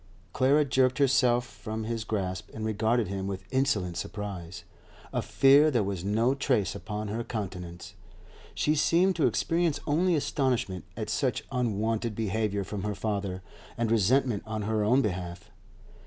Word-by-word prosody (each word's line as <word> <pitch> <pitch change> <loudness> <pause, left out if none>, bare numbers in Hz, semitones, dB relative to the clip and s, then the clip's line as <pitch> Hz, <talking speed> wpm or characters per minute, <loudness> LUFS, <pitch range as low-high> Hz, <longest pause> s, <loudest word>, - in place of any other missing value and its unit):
Clara 140 +3 +4
jerked 130 -2 +2
herself 125 -3 +3
from 110 +1 -6
his 115 0 -3
grasp 95 -5 -3
and 110 0 -4
regarded 110 +1 +1
him 95 0 -3
with 95 -1 -5
insolent 110 -10 0
surprise. 95 -4 -6 0.5
Of - - -1
fear 140 +3 +6
there 120 -7 +1
was 95 -3 -3
no 110 +6 +2
trace 130 -7 0
upon 105 +2 -5
her 115 +3 -2
countenance; 90 -6 -6 0.6
she 150 - +2
seemed 175 +5 +3
to 160 - +4
experience 165 -3 +1
only 175 +4 +2
astonishment 130 - -1
at - - -3
such - - 0
unwonted 115 -2 -1
behaviour 105 -1 -1
from 100 +1 -5
her 105 +1 -2
father, 100 -3 -3 0.3
and 115 -1 0
resentment 115 +1 +2
on 110 -1 -3
her 110 0 0
own 125 +6 +4
behalf. 90 -4 -4
110 Hz, 150 wpm, -28 LUFS, 100-130 Hz, 0.6 s, fear